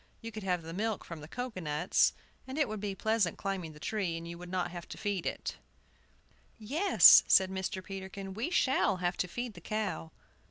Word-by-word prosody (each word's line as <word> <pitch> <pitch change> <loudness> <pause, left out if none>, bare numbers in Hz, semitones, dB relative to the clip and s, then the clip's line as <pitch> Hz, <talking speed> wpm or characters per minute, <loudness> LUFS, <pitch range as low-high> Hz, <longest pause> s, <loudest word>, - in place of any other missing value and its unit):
You 230 - -7
could 215 0 -7
have 180 -3 -1
the 165 +1 -7
milk 215 +2 -2
from 165 -3 -8
the 150 - -9
cocoa 245 +1 -5
nuts, 150 +2 +2 0.3
and 265 +2 -6
it 305 - +2
would 215 -1 -4
be 200 -1 -3
pleasant 220 -4 +1
climbing 190 -5 -3
the 150 - -14
tree, 185 -3 -2
and 165 0 -7
you 170 - -6
would 175 +1 -10
not 180 -1 -1
have 175 -1 -8
to - - -7
feed 205 -4 -2
it. - - -4 1.0
"Yes," 295 - +7
said 190 0 +5
Mr. 190 0 -3
Peterkin, 195 0 -7
"we 225 - -2
shall 265 - +2
have 180 0 -1
to 180 - 0
feed 240 +5 -5
the 175 - -12
cow." 210 -4 -3
190 Hz, 205 wpm, -31 LUFS, 175-215 Hz, 1.0 s, Yes